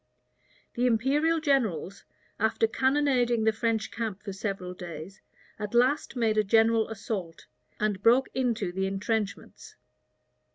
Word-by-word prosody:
The 245 +1 +1
imperial 285 +8 +2
generals, 220 - 0 0.3
after 220 +1 +2
cannonading 255 -2 +1
the 220 - +4
French 220 0 -1
camp 220 -4 -4
for 200 - -5
several 195 -2 -4
days, 175 +2 -9 0.4
at 210 +2 -4
last 260 +4 +2
made 220 -3 +2
a - - +3
general 225 +2 +3
assault, 200 -6 -5 0.3
and 210 -2 -1
broke 245 +5 +4
into 235 -7 -1
the 190 +1 -1
intrenchments. 205 +1 -4
220 Hz, 125 wpm, -28 LUFS, 195-245 Hz, 0.4 s, the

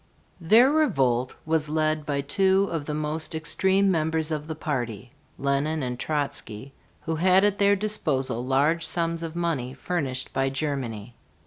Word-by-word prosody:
Their 225 +10 +5
revolt 130 - +1
was 155 -1 0
led 155 -1 0
by 140 -1 0
two 190 +6 +2
of 160 -3 -3
the 150 - -3
most 155 +2 -3
extreme 190 +4 +2
members 160 -1 0
of 150 -1 -3
the 160 - -4
party, 125 - -4 0.3
Lenine 140 +2 0
and 125 -1 -4
Trotzky, 140 -5 -4 0.3
who 160 -1 -3
had 185 +3 +4
at 205 -1 +1
their 200 0 +4
disposal 150 - -1
large 145 +6 +2
sums 165 0 -1
of 165 0 -6
money 150 -7 -2
furnished 140 -8 -3
by 135 0 +1
Germany. 130 -6 -3
155 Hz, 150 wpm, -25 LUFS, 135-170 Hz, 0.3 s, Their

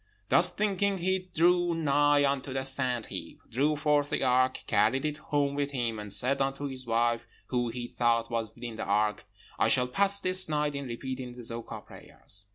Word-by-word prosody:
Thus - - +5
thinking 200 -1 0
he 185 +1 -2
drew 175 +1 +3
nigh 145 -2 +3
unto 140 -1 -1
the 135 0 -2
sand 130 -3 0
heap, - - -8
drew 145 +6 +1
forth 145 -1 +1
the - - -1
ark, 130 0 +2
carried 110 +7 +2
it 150 0 -2
home 145 -2 -1
with 140 0 -1
him, 115 -4 -2
and 105 -1 -6
said 130 +8 +4
unto 135 +1 -2
his 130 -2 -6
wife, 115 0 0 0.2
who 120 -2 0
he 120 +1 -5
thought 115 -1 0
was 115 -2 -2
within 120 -2 -7
the - - -3
ark, 105 +1 0 0.3
'I - - +3
shall 125 0 +3
pass 200 +8 +2
this 185 -2 +3
night 150 -1 0
in 140 -1 -5
repeating 125 +1 -6
the 120 0 -10
Zoka 115 0 -6
prayers.' 100 0 -12
135 Hz, 190 wpm, -29 LUFS, 120-150 Hz, 0.3 s, Thus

